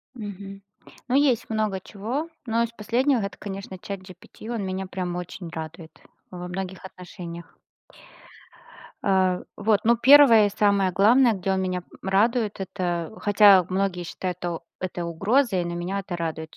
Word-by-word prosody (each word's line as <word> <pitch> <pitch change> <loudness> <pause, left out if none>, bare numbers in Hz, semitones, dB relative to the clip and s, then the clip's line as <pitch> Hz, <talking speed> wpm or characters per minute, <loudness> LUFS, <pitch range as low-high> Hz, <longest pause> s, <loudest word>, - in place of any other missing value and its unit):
Мгм, 200 -2 -8 0.5
ну, 255 - 0
есть 260 -5 +2
много 215 -3 -1
чего, 240 +13 -4 0.2
но 230 0 0
из 235 - -3
последнего 245 +4 +1
это, 200 -2 -4
конечно, 195 -1 -7
ChatGPT, 185 +2 -10
он 220 - -3
меня 190 0 -3
прям 180 -1 -4
очень 180 0 -7
радует 160 0 -9 0.3
во 180 -1 -7
многих 190 +1 -6
отношениях. 175 -2 -10 1.4
А, 185 -2 +2 0.2
вот, 210 0 +2
ну, 235 +1 +4
первое 250 -5 +7
и - - -2
самое 200 -2 +2
главное, 230 +6 +5
где 190 0 -2
он 190 - 0
меня 185 -1 -2 0.2
радует- 215 +3 +1
это 175 -3 -3
хотя 205 -2 +6
многие 185 -1 -1
считают, 180 +1 -5
что 175 -2 -4 0.2
это 180 -2 -4
угрозой, 195 - +1
но 170 - -4
меня 180 +3 -3
это 190 -2 -5
радует, 160 -1 -5
195 Hz, 150 wpm, -24 LUFS, 180-215 Hz, 1.4 s, первое